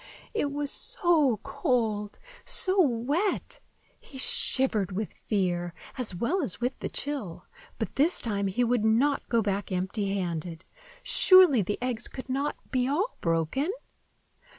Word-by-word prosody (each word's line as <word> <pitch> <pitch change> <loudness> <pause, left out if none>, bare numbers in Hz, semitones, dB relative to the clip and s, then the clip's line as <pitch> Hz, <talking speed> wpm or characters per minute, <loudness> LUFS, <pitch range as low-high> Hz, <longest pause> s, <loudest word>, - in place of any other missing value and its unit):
It 295 -10 -1
was 290 0 -2
so 345 - +1
cold, 220 - -1 0.3
so 380 -4 +5
wet! 285 - 0 0.4
He 270 - -13
shivered 250 -6 +1
with 200 +3 -4
fear, 175 -4 -2 0.2
as 235 -8 -4
well 290 - 0
as 255 - -4
with 245 +2 -2
the - - -4
chill; 275 - -5 0.3
but - - -5
this 310 +6 +3
time 200 -3 -1
he 195 +6 0
would 240 -2 +1
not 245 +6 +2
go 230 -2 +2
back 200 0 -2
empty 195 +2 -1
handed. 170 -2 -4 0.4
Surely, 365 - +6
the 205 +2 -2
eggs 245 -2 -1
could 260 0 -9
not 275 +3 -1 0.2
be 255 -1 +1
all 375 - -1
broken? 165 - 0
240 Hz, 140 wpm, -27 LUFS, 200-285 Hz, 0.4 s, Surely